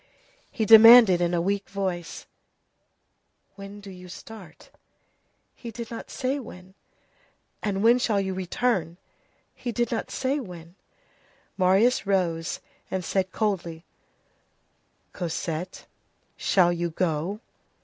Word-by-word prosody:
He 220 - -2
demanded 225 -4 +9
in 175 0 +1
a 170 - +1
weak 200 +2 -2
voice:— 185 -4 -4 1.2
"And - - -43
when 200 +1 -10
do 200 -1 -10
you 180 0 -12
start?" 195 -3 -12 0.8
"He 235 - -9
did 230 0 -8
not 230 - -8
say 270 +1 -2
when." 185 -6 -12 0.9
"And 200 -1 -2
when 235 +2 +5
shall 215 -4 +1
you 190 -1 -2
return?" 185 -2 -1 0.6
"He 245 - -5
did 240 +1 -1
not 230 - -3
say 270 +2 -1
when." 175 -8 -10 0.8
Marius 195 +5 +2
rose 170 -4 -1 0.3
and 185 -2 -3
said 190 0 -1
coldly:— 175 -6 -3 1.3
"Cosette, 170 0 -5 0.5
shall 175 -2 +2
you 170 0 -2
go?" 170 +3 -2
195 Hz, 120 wpm, -25 LUFS, 175-225 Hz, 1.3 s, demanded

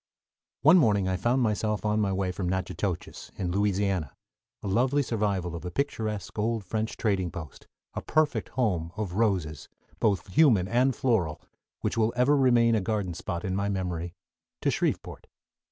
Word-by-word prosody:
One 160 +6 +8
morning 105 - +3
I 95 - +1
found 120 +8 +1
myself 105 -1 0
on 105 0 +2
my 100 -2 +1
way 95 -1 -1
from 90 -1 -3
Natchitoches, 90 -1 -3
in 90 -2 -2
Louisiana, 100 -5 0 0.5
a - - -3
lovely 130 +8 +2
survival 100 -7 -1
of 85 - -7
a 90 - -4
picturesque 110 -4 -3
old 110 0 0
French 110 +4 -3
trading 95 -5 0
post, 80 -4 -9 0.3
a - - -4
perfect 155 -1 +1
home 90 -10 0
of 105 -5 -3
roses, 90 - 0 0.3
both 100 -6 +1
human 110 - +5
and 125 +4 +2
floral, 95 -12 0 0.4
which - - -1
will 110 +1 +2
ever 125 +4 +4
remain 120 -4 +4
a 110 - +2
garden 100 -3 -2
spot 85 0 -4
in 95 -1 -1
my 100 +1 0
memory, 90 -3 -3 0.5
to - - +3
Shreveport. - - -2
100 Hz, 165 wpm, -27 LUFS, 90-115 Hz, 0.5 s, One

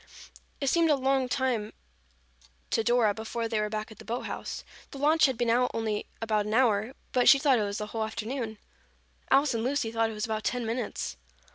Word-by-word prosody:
It 280 - -2
seemed 330 +4 +3
a 295 - +5
long 265 -1 +1
time 245 -5 -1 1.0
to 225 - +2
Dora 235 -3 +3
before 225 +2 -3
they 225 -1 -1
were 210 0 0
back 215 +1 -4
at 220 - -13
the - - -10
boat 235 +2 -3
house. - - -5 0.3
The - - -9
launch 305 +2 +4
had 260 -3 -2
been 235 -1 +1
out 250 +1 +3
only 220 -2 -2 0.2
about 215 -2 0
an 215 - -1
hour, 230 0 +2 0.2
but 250 -1 +4
she - - +9
thought 270 -3 +3
it - - +1
was 200 0 -3
the 210 - -3
whole 220 +1 -3
afternoon. 220 +1 -4 0.7
Alice 275 +1 +4
and 225 -1 -1
Lucy 255 -3 0
thought 225 0 +1
it - - -6
was 210 0 -2
about 220 -1 -3
ten 245 -1 -1
minutes. 225 - -3
230 Hz, 215 wpm, -28 LUFS, 220-260 Hz, 1.0 s, she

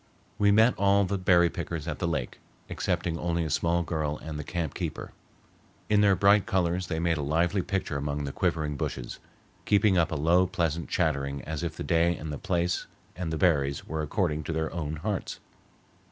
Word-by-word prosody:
We 100 - +4
met 110 +4 +5
all 100 0 +4
the 100 +1 -2
berry 85 -2 +4
pickers 85 -3 -5
at 75 - -3
the 85 - 0
lake, 75 -7 -3 0.3
excepting 80 -1 -1
only 85 0 0
a 80 - -3
small 85 +3 +1
girl 75 -3 -2
and 75 -1 -7
the - - -4
camp 85 -2 -3
keeper. - - -5 0.8
In 105 -1 +4
their 100 -2 +5
bright 100 +1 +4
colors 90 0 0
they 80 - -2
made 85 0 +1
a - - -2
lively 85 +7 +1
picture 95 -5 -2
among 70 +1 -2
the 70 - -3
quivering 75 -1 -1
bushes, - - -4 0.5
keeping 100 -3 +4
up 85 - +1
a - - -1
low 85 +5 +3
pleasant 85 -4 -2
chanting 70 -3 -1
as 80 0 -4
if 85 -2 -4
the - - -4
day 85 0 +2
and 75 -1 -6
the 75 - -5
place 90 0 -1 0.3
and 85 -1 -4
the 80 - -1
berries 70 -6 +1
were 80 0 -2
according 75 -1 -1
to - - -3
their 80 0 -2
own 80 -3 -3
hearts. 95 +4 -3
85 Hz, 195 wpm, -28 LUFS, 75-90 Hz, 0.8 s, met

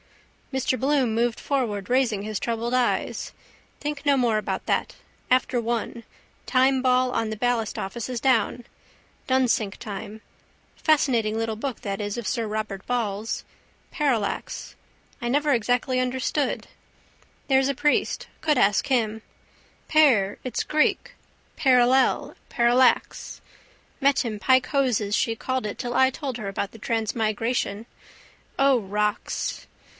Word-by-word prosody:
Mr 265 -1 0
Bloom 265 -4 +1
moved 235 +1 0
forward, 220 -8 -2
raising 245 -6 +1
his 215 -1 -3
troubled 235 +1 -2
eyes. 250 -1 0 0.5
Think 295 0 -4
no 285 -1 +4
more 235 -4 +2
about - - -4
that. - - -1 0.3
After 255 -1 +2
one. 235 0 -3 0.4
Timeball 255 -1 +3
on 225 - 0
the 220 - -4
ballastoffice 230 -1 -2
is 250 -2 -3
down. 245 -1 +1 0.6
Dunsink 250 -6 +1
time. 210 +1 -7 0.5
Fascinating 240 -8 +2
little 225 -1 -1
book 250 +3 -5
that 200 0 -3
is 205 +2 -3
of 235 - -4
sir 230 -3 -1
Robert 215 -2 -4
Ball's. 225 -3 -2 0.5
Parallax. 260 - -2 0.5
I 240 - -2
never 290 +3 +2
exactly 245 +2 +1
understood. 260 +2 -1 0.8
There's 265 0 +3
a 275 - -1
priest. 295 +3 0
Could 300 -3 +2
ask 205 +4 +3
him. 220 -5 0 0.7
Par 250 -11 +4
it's 255 - -2
Greek: 305 0 +1 0.4
parallel, 260 -2 +3
parallax. 245 +1 +2 0.6
Met 280 -1 +3
him 215 -3 -4
pike 260 +2 +4
hoses 240 -7 +1
she 230 - +1
called 260 +1 -2
it 205 - -6
till 240 0 -4
I 260 +1 +5
told 265 -2 -5
her 210 -4 -4
about 195 0 -3
the 225 - -13
transmigration. 225 0 -1 0.7
O 275 -2 +5
rocks! 210 0 -2
240 Hz, 130 wpm, -25 LUFS, 215-260 Hz, 0.8 s, I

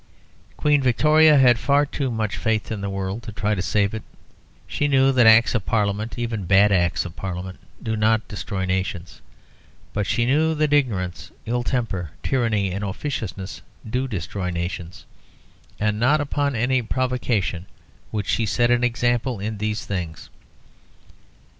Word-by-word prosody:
Queen 150 -2 +3
Victoria 150 +4 +5
had 125 -3 +5
far 140 +2 +3
too 140 -1 -3
much 110 -3 -2
faith 110 -1 -1
in 105 -2 -3
the 100 - -3
world 95 +3 -3
to 120 -2 -8
try 105 +1 -1
to 95 - -1
save 100 +2 +1
it. 110 - -4 0.6
She 145 - -1
knew 135 -1 +4
that 125 -3 +4
Acts 110 +1 +6
of 110 -4 0
Parliament, 105 +1 -1
even 115 -5 -3
bad 100 +3 +5
Acts 85 -2 +1
of 85 -1 -8
Parliament, 95 0 -6 0.2
do 110 -1 -1
not 110 +1 +2
destroy 100 -2 -4
nations. 95 -2 -3 0.7
But 105 -1 -1
she 120 - +1
knew 155 +5 +2
that 150 -1 +1
ignorance, 90 - 0 0.2
ill 120 +2 -1
temper, 115 - -2
tyranny, 115 -7 0
and 100 +3 -4
officiousness 100 -3 -5 0.3
do 125 +4 -1
destroy 95 -3 -4
nations, 85 0 -5 0.7
and 105 0 0
not 135 +6 +3
upon 145 -1 -1
any 125 +3 +1
provocation 115 -7 -1 0.4
would 105 -2 -2
she 110 +2 0
set 120 +3 +2
an 120 0 +3
example 120 -1 0
in 105 +1 -4
these 105 0 -2
things. 85 -5 -5
110 Hz, 155 wpm, -23 LUFS, 95-125 Hz, 0.7 s, Acts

